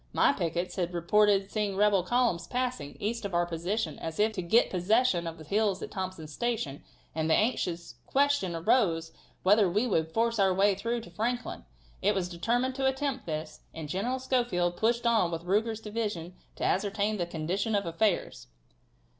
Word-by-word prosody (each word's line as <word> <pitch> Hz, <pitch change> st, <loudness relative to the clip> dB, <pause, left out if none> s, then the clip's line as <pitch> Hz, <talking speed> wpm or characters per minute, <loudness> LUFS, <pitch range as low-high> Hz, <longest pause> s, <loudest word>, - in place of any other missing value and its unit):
My -, -, +4 dB
pickets 175 Hz, -, -2 dB
had 175 Hz, -1 st, -1 dB
reported 200 Hz, +3 st, +3 dB
seeing 210 Hz, -3 st, -1 dB
rebel 205 Hz, -1 st, +4 dB
columns 185 Hz, -4 st, +1 dB
passing, 250 Hz, -, -3 dB
east 225 Hz, +2 st, -2 dB
of 200 Hz, -3 st, -3 dB
our 175 Hz, 0 st, +3 dB
position, 170 Hz, 0 st, -2 dB
as 160 Hz, +2 st, -5 dB
if 215 Hz, +1 st, +3 dB
to 185 Hz, -, -3 dB
get 200 Hz, +8 st, +3 dB
possession 185 Hz, -1 st, +2 dB
of 165 Hz, 0 st, -6 dB
the 160 Hz, -, -10 dB
hills 200 Hz, +3 st, +1 dB
at -, -, -6 dB
Thompson's 185 Hz, -6 st, -5 dB
Station, 220 Hz, -, -2 dB, 0.3 s
and 160 Hz, 0 st, -1 dB
the 160 Hz, -, +5 dB
anxious 175 Hz, -, -1 dB
question 280 Hz, -11 st, +2 dB
arose 165 Hz, -3 st, +2 dB, 0.3 s
whether 200 Hz, 0 st, +5 dB
we 210 Hz, +8 st, +1 dB
could 160 Hz, -7 st, 0 dB
force 230 Hz, +3 st, +1 dB
our 190 Hz, -2 st, +4 dB
way 200 Hz, +1 st, +4 dB
through 230 Hz, +5 st, -2 dB
to 225 Hz, -, -12 dB
Franklin. 240 Hz, -, -3 dB, 0.4 s
It 205 Hz, +1 st, +2 dB
was 180 Hz, -2 st, -1 dB
determined 240 Hz, +9 st, 0 dB
to 270 Hz, 0 st, +1 dB
attempt 265 Hz, -2 st, -2 dB
this, 155 Hz, -1 st, -4 dB, 0.2 s
and 160 Hz, -2 st, -6 dB
General 205 Hz, -, -1 dB
Schofield 240 Hz, -10 st, 0 dB
pushed 235 Hz, +3 st, +1 dB
on 225 Hz, -7 st, +3 dB
with 165 Hz, 0 st, -4 dB
Ruger's 220 Hz, +4 st, 0 dB
division 210 Hz, -6 st, -4 dB, 0.2 s
to -, -, -6 dB
ascertain 205 Hz, +2 st, 0 dB
the 175 Hz, -2 st, -2 dB
condition 180 Hz, +7 st, -1 dB
of 200 Hz, -, 0 dB
affairs." 170 Hz, -, -1 dB
200 Hz, 180 wpm, -29 LUFS, 170-230 Hz, 0.4 s, the